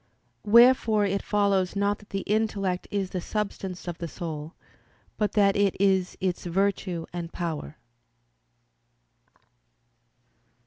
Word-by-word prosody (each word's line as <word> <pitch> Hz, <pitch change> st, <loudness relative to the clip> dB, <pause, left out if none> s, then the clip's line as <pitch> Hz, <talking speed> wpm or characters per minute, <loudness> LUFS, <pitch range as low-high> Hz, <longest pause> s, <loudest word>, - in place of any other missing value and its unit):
Wherefore 230 Hz, -2 st, +6 dB
it 200 Hz, 0 st, 0 dB
follows 200 Hz, -3 st, +1 dB
not 200 Hz, +1 st, 0 dB
that 210 Hz, -, -18 dB
the 195 Hz, -, -3 dB
intellect 200 Hz, -4 st, -1 dB
is 195 Hz, -2 st, -2 dB
the 185 Hz, -, -3 dB
substance 195 Hz, -3 st, -4 dB
of 175 Hz, -1 st, -5 dB
the 170 Hz, -, -4 dB
soul, 160 Hz, -1 st, -6 dB, 0.6 s
but 210 Hz, -1 st, -1 dB
that 200 Hz, -2 st, +4 dB
it 200 Hz, -2 st, +2 dB
is 190 Hz, -2 st, +2 dB
its 185 Hz, -2 st, -2 dB
virtue 185 Hz, -2 st, -1 dB
and 170 Hz, -1 st, -5 dB
power. 160 Hz, -3 st, -5 dB
195 Hz, 120 wpm, -26 LUFS, 175-205 Hz, 0.6 s, Wherefore